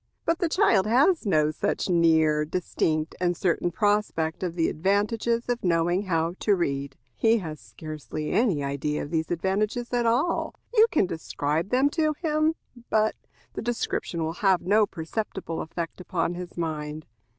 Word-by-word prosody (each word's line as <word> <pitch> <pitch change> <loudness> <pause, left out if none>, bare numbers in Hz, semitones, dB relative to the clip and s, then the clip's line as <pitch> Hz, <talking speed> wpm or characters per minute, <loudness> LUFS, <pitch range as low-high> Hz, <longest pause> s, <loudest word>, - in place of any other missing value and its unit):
But 330 0 +1
the 345 - +1
child 230 - +3
has 270 - +3
no 155 -5 +3
such - - -1
near, 160 -3 +3
distinct, 155 -1 -1
and 175 -1 +1
certain 175 0 +1
prospect 205 -5 0
of 175 -2 -3
the 165 -2 +2
advantages 210 +7 0
of 245 -1 -2
knowing 175 +2 +1
how 165 -2 0
to 205 - +3
read. 140 -5 -2 0.2
He 225 - +3
has 160 -7 -6
scarcely 150 +7 -6
any 195 - +2
idea 140 +2 -2
of 145 - -8
these 160 -1 -1
advantages 205 +8 -1
at 240 -1 +2
all. 255 +9 +1 0.2
You 445 -1 +6
can 300 - +2
describe 160 0 -2
them 265 +3 +3
to 310 -1 +1
him, 310 0 +1 0.3
but 215 0 +2 0.4
the - - -4
description 225 -7 -2
will 160 +1 -2
have 190 -3 +4
no 210 +2 +4
perceptible 175 0 -4
effect 170 +2 -5
upon 175 -1 -1
his 175 0 -8
mind. 155 -2 -4
180 Hz, 160 wpm, -26 LUFS, 160-225 Hz, 0.4 s, You